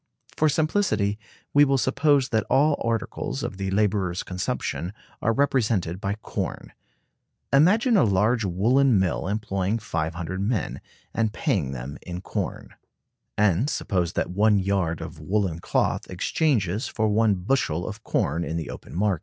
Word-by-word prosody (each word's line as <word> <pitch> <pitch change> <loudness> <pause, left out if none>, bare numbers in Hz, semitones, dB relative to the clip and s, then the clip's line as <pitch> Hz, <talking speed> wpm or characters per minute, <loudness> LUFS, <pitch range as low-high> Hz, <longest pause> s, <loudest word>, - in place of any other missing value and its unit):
For 155 - +3
simplicity 140 - +1 0.3
we 145 - +7
will 135 -1 +3
suppose 140 +1 +2
that 110 -3 0
all 145 +3 +4
articles 115 -3 -2
of - - -4
the 95 0 -2
laborer's 95 -3 0
consumption 90 -2 -3 0.3
are 115 - +2
represented 110 -9 +1
by 100 +1 -1
corn. - - -4 0.8
Imagine 210 - +5
a - - +5
large 105 +3 +2
woolen 115 +7 +3
mill 95 -1 0
employing 100 0 -1
500 85 -2 -3
men, 105 -2 -1 0.3
and 110 -2 +1
paying 95 - 0
them 65 +2 -7
in 90 -1 -6
corn; 95 - -5 0.6
and 105 - +3
suppose 90 - -1
that - - -1
one 105 +2 +3
yard 95 -4 0
of 80 -1 -8
woolen 95 0 -1
cloth - - 0
exchanges 105 - 0
for 110 -2 0
one 105 0 +3
bushel 90 - 0
of 110 +1 -7
corn 80 +4 0
in 80 +1 -3
the 80 - -4
open - - -10
market. 95 -2 +1
100 Hz, 145 wpm, -25 LUFS, 90-120 Hz, 0.8 s, we